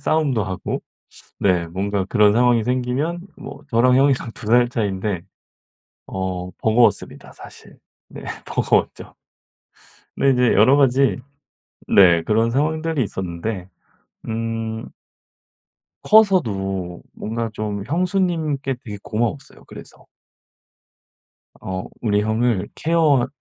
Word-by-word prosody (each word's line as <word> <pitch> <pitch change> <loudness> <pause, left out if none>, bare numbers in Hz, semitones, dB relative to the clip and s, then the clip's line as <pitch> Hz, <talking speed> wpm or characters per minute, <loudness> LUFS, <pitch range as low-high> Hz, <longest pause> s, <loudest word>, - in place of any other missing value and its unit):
싸움도 140 -9 +1
하고 95 -1 -4 0.6
네 90 -3 +2
뭔가 95 +3 -2
그런 105 -1 +4
상황이 120 0 +3
생기면 130 +7 -1 0.2
뭐 - - -10
저랑 125 +2 +4
형이랑 135 -3 +2
2 110 - -10
살 120 +2 +4
차이인데 100 -5 -2 0.9
어 95 -1 -4
버거웠습니다 115 +2 +1
사실. - - -14 0.3
네. - - -10 0.2
버거웠죠. - - -1 1.0
근데 135 - +3
이제 125 -1 +3
여러 110 +7 +5
가지 135 -1 +3 0.7
네 85 -4 +5
그런 115 +5 +1
상황들이 155 +3 0
있었는데. 95 0 -5 0.6
음. 115 0 -3 1.2
커서도 100 - +2
뭔가 115 +1 -4
좀 105 -2 -4
형수님께 165 - -1
되게 105 -2 -7
고마웠어요 120 +5 -3
그래서. - - -13 1.5
어 95 0 -5 0.2
우리 105 -2 +1
형을 110 -2 0
케어 155 -6 +2
115 Hz, 225 characters per minute, -21 LUFS, 100-135 Hz, 1.5 s, 여러